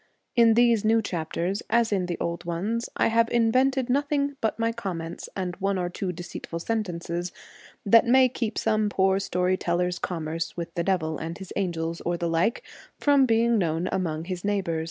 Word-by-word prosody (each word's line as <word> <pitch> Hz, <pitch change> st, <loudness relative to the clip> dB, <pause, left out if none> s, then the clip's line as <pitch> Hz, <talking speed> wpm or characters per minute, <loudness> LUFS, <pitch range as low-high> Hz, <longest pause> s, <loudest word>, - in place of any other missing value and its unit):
In 230 Hz, -2 st, +6 dB
these 235 Hz, -2 st, +4 dB
new 225 Hz, +1 st, +4 dB
chapters, 180 Hz, +1 st, -2 dB
as 230 Hz, 0 st, +2 dB
in 190 Hz, -3 st, 0 dB
the 175 Hz, -, -3 dB
old 170 Hz, +1 st, -3 dB
ones, 195 Hz, +8 st, -2 dB
I -, -, +3 dB
have 230 Hz, 0 st, +3 dB
invented 255 Hz, +3 st, +2 dB
nothing 285 Hz, +1 st, 0 dB
but 220 Hz, -, 0 dB
my 230 Hz, 0 st, +1 dB
comments 175 Hz, -7 st, -5 dB
and 180 Hz, -2 st, -3 dB
one 195 Hz, 0 st, 0 dB
or 175 Hz, -1 st, -1 dB
two 185 Hz, 0 st, -3 dB
deceitful 175 Hz, -1 st, -7 dB
sentences 175 Hz, -3 st, -3 dB, 0.5 s
that 230 Hz, +3 st, +6 dB
may 260 Hz, +1 st, +6 dB
keep 230 Hz, -3 st, -3 dB
some 215 Hz, -1 st, +1 dB
poor 190 Hz, -1 st, +2 dB
story 180 Hz, -1 st, 0 dB
teller's 180 Hz, 0 st, -1 dB
commerce 165 Hz, -1 st, -3 dB
with 170 Hz, -1 st, -5 dB
the 170 Hz, -, -1 dB
devil 160 Hz, -4 st, 0 dB
and 165 Hz, +1 st, -5 dB
his 190 Hz, -2 st, -9 dB
angels, 170 Hz, -3 st, -2 dB
or 175 Hz, 0 st, -1 dB
the 170 Hz, -, -2 dB
like, 165 Hz, +7 st, +1 dB, 0.4 s
from 280 Hz, -2 st, +4 dB
being 230 Hz, 0 st, +3 dB
known 165 Hz, 0 st, 0 dB
among 165 Hz, -4 st, -2 dB
his 180 Hz, -1 st, -5 dB
neighbours. 195 Hz, -5 st, 0 dB
190 Hz, 180 wpm, -26 LUFS, 170-230 Hz, 0.5 s, In